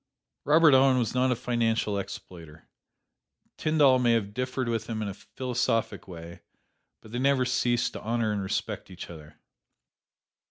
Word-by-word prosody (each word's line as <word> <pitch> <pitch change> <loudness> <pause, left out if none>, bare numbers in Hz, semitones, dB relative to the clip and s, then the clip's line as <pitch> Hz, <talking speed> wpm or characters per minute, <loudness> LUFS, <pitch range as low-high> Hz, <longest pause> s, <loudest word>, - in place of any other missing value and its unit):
Robert 155 0 +6
Owen 130 0 +5
was 120 -3 0
not 130 0 +2
a - - +2
financial 115 -4 0
exploiter. 80 -5 -10 0.9
Tyndall 145 -5 +3
may 120 -2 +3
have 105 -3 -1
differed 125 +1 -2
with 115 -1 -2
him 110 -2 -3
in - - -3
a 100 - -4
philosophic 125 0 -2
way; 85 -1 -10 0.6
but 110 - -14
they 120 - -3
never 135 -1 +2
ceased 120 -1 0
to - - -7
honor 115 -1 -1
and 105 -1 -2
respect 95 - -3
each 90 -1 -9
other. 75 -2 -12
115 Hz, 155 wpm, -27 LUFS, 100-130 Hz, 0.9 s, Robert